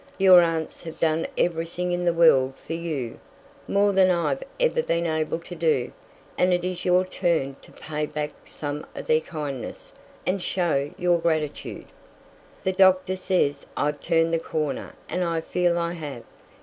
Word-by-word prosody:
Your 185 -2 +8
aunts 165 -2 -1
have 165 -2 -9
done 160 0 +1
everything 170 +1 -1
in 175 0 -1
the 170 - +4
world 135 -6 +4
for 165 - -4
you, 155 -8 -4 0.5
more 200 0 +3
than 190 -1 +5
I've 175 - +1 0.2
ever - - +2
been 170 - 0
able 160 -1 0
to 170 +2 -10
do, 155 -7 +1 0.5
and 180 - +4
it 175 -1 +1
is 180 -1 -3
your 180 +1 +3
turn 170 -7 0
to - - -16
pay 150 -1 -4
back 150 0 -3
some 145 0 -5
o' - - -5
their 155 0 +3
kindness 150 -6 -6 0.3
and 185 +1 0
show 160 -6 0
your 175 -1 +2
gratitude. 155 -3 -2 0.8
The 190 - +1
doctor 185 0 +4
says 180 -7 0
I've 145 0 0
turned 165 -1 +2
the 165 - +2
corner 155 -3 -3
and 180 - -1
I 165 -1 0
feel 175 +1 +1
I 170 0 -1
have. 145 -8 -7
170 Hz, 165 wpm, -25 LUFS, 155-180 Hz, 0.8 s, Your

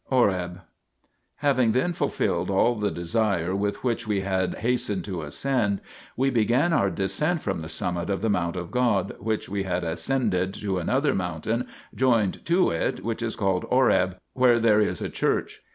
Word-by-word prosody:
HOREB 95 -8 +1 0.7
Having 130 -6 +2
then 135 +9 +1
fulfilled - - -1
all 100 +5 +3
the 105 -3 -1
desire 90 0 0
with 100 +1 -2
which 120 -3 -1
we 100 -2 0
had 95 -1 -1
hastened 115 -6 -1
to 95 -4 -4
ascend, 100 - 0 0.4
we 135 +2 +2
began 125 +8 +2
our 100 -10 +3
descent 150 - -1
from - - -2
the 80 0 -7
summit 85 +2 -3
of 95 -1 -1
the 110 - +1
mount 85 -3 0
of 90 -2 -5
God 115 -7 +1
which 110 +1 -2
we 100 0 -2
had 90 -2 -2
ascended 95 +1 0
to 95 -3 -2
another 135 - +1
mountain 95 +6 -2 0.3
joined 115 -7 +1
to 175 +2 +3
it, 85 +2 -2
which 115 +1 -3
is 115 -1 -2
called 95 -4 0
Horeb, 95 -8 +3 0.2
where 125 -2 +4
there 110 -2 +4
is 105 - 0
a - - -2
church. - - -1
105 Hz, 170 wpm, -25 LUFS, 95-125 Hz, 0.7 s, where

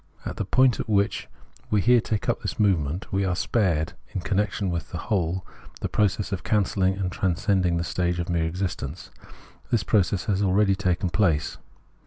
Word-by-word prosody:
At - - -5
the 105 - -2
point 130 +4 +3
at - - -4
which 100 -1 +1 0.4
we 105 - +3
here 120 +4 +5
take 110 -1 -2
up - - 0
this - - -4
movement, 90 -4 +1
we 100 +1 +2
are 90 -2 0
spared, 90 -5 0 0.2
in 95 - -1
connection 100 0 0
with 85 -3 -4
the - - -5
whole, 90 -2 -1 0.4
the - - -2
process 105 -1 +1
of 95 - -3
cancelhng 95 -2 +1
and 90 -2 -1
transcending 90 -1 +1
the 85 - 0
stage 90 +1 -1
of 85 0 -2
mere 85 -2 0
existence. 85 -3 -4 0.6
This 115 -5 +1
process 95 0 +1
has 100 -2 0
already 100 +1 +3
taken 95 -2 0
place. 85 -8 +1
95 Hz, 180 wpm, -25 LUFS, 85-105 Hz, 0.6 s, here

